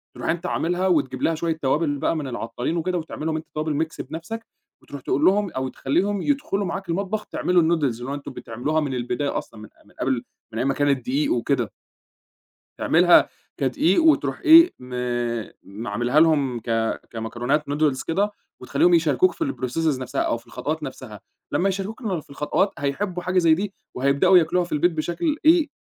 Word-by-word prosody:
ترُوح - - -4
أنت 170 0 -1
عاملها 180 +3 0
وتجيب 135 -7 +1
لها 165 - +2
شوية 165 0 -2
توابل 145 +2 +1
بقى 155 - 0
من 150 -3 -3
العطّارين 120 +5 -3
وكده 180 +2 -1
وتعمل 160 -2 -6
لهم 160 -1 0
أنت 155 0 -5
توابل 155 0 0
mix 160 - -9
بنَفسك 225 +8 -6 0.4
وترُوح 140 - -9
تقول 145 +4 0
لهم 200 0 +3
أو 130 0 -2
تخلّيهم 190 +11 0
يدخُلوا 275 -9 0
معاك 190 +1 -5
المطبخ 200 +5 -2
تعملوا 180 -1 +1
الnoodles 160 -1 +1 0.2
اللي 125 - -6
هو - - -2
أنتم 145 0 -6
بتعملوها 125 +8 -2
من 145 -4 -2
البداية 125 +3 -2
أصلًا 110 - -7
من 110 - -11 0.2
من 105 - -22
قبل، 130 -2 0 0.3
من - - -5
أيام 125 - 0
ما 135 - +2
كانت 140 -1 +1
دِقيق 290 +5 +1
وكده. - - 0 1.1
تعملها - - +5 0.3
كدقيق 340 - +2
وتروح 320 -2 +3
إيه، 335 0 +8
م 125 0 -10 0.7
م 105 +4 -8
عاملها 120 +8 +2
لهم 145 -7 +3
ك 115 0 -1
كمكرونات 120 +6 -2
نودلز 145 -2 +1
كده 200 +5 0 0.3
وتخليهم 140 +7 +3
يشاركوك 165 - +3
في 330 - -3
الprocesses 155 - -1
نفسها 130 - -3
أو - - 0
في - - -20
الخطوات - - -4
نفسها، - - -8 0.3
لما 195 - +2
يشاركوك 195 +4 -4
ال 190 -8 -2
في - - -25
الخطوات 150 +7 0
هيحبوا 175 +6 -2
حاجة 185 +1 0
زي 165 -3 +5
دي 195 +3 -4 0.2
وهيبدأوا 140 +8 +4
ياكلوها 175 +2 +1
في 175 - -12
البيت 155 +4 +3
بشكل 175 - -1
إيه، 320 -1 +5
160 Hz, 185 wpm, -23 LUFS, 135-190 Hz, 1.1 s, إيه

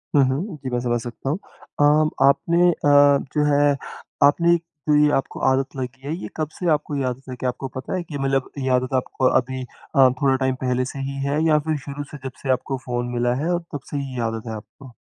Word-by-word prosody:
हुँ, 140 - +6
हुँ, 150 +7 -2
जी, 130 - -3
मैं 125 -1 -1
समझ 120 -1 0
सकता 120 +3 -6
हूँ। 155 - 0 0.4
अ, - - +5 0.4
आपने 170 +5 +4
अ, - - 0 0.6
जो 150 -1 +2
है, 145 -1 +3 0.5
आपने 170 +4 +5 0.3
जो 150 - +5
ये 150 - +4
आपको 135 - -4
आदत 135 +1 -1
लगी 130 +1 -5
है, 150 - -1
ये - - -6
कब 155 -1 -1
से 180 - 0
आपको 150 -1 0
ये 140 - -1
आदत 130 +1 -4
लगी 125 - -6
है? - - +3
आपको 125 +2 -3
पता 130 +8 -4
है 180 - -2
कि 150 -3 -6
मतलब 135 -1 0
ये 130 - -1
आदत 130 +1 -3
आपको 130 0 +1
अभी 130 0 -5
अ, 130 +1 +2
थोड़ा 135 -2 +4
टाइम 130 0 0
पहले 125 0 +1
से 135 - -7
ही 135 0 -4
है 145 +2 0
या 155 -2 +4
फिर 155 -1 +1
शुरू 145 0 -5
से 150 - -7
जब 130 - -3
से 135 - -4
आपको 130 +1 -1
फ़ोन 120 -1 -2
मिला 120 0 +1
है, 175 - 0
और 175 - +1
तब 145 - -2
से 145 - -2
ही 140 -2 -4
ये 120 - -2
आदत 115 +1 -6
है 110 - -4
आपको? 115 +4 -12
135 Hz, 245 wpm, -22 LUFS, 130-145 Hz, 0.6 s, हुँ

